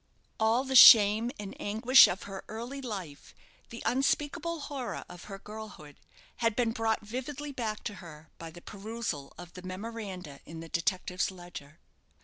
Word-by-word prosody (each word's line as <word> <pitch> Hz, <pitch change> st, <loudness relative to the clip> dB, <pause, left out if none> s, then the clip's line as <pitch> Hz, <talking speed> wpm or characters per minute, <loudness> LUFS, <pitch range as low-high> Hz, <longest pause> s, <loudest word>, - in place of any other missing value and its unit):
All 225 Hz, +3 st, +2 dB
the 265 Hz, -1 st, -3 dB
shame 220 Hz, -1 st, +9 dB
and 200 Hz, -2 st, -7 dB
anguish 230 Hz, +6 st, +6 dB
of 185 Hz, -, -4 dB
her 195 Hz, -1 st, -8 dB
early 240 Hz, +6 st, -6 dB
life, 190 Hz, -, -7 dB, 0.3 s
the 235 Hz, -, -9 dB
unspeakable 295 Hz, +5 st, 0 dB
horror 275 Hz, -4 st, -5 dB
of 180 Hz, -1 st, -12 dB
her 195 Hz, -2 st, -8 dB
girlhood, 210 Hz, -8 st, -11 dB, 0.4 s
had 230 Hz, -2 st, +1 dB
been 235 Hz, -1 st, +1 dB
brought 225 Hz, -1 st, -1 dB
vividly 265 Hz, +6 st, -5 dB
back 225 Hz, -5 st, -4 dB
to 210 Hz, -, -4 dB
her 155 Hz, -2 st, -13 dB
by 165 Hz, -, -7 dB
the 175 Hz, +2 st, -14 dB
perusal 205 Hz, -9 st, -5 dB
of 175 Hz, -1 st, -11 dB
the 180 Hz, -, -10 dB
memoranda 185 Hz, -5 st, -7 dB
in 160 Hz, +1 st, -10 dB
the 165 Hz, 0 st, -9 dB
detective's 180 Hz, +3 st, -1 dB
ledger. 175 Hz, -6 st, -11 dB
210 Hz, 155 wpm, -30 LUFS, 180-235 Hz, 0.4 s, shame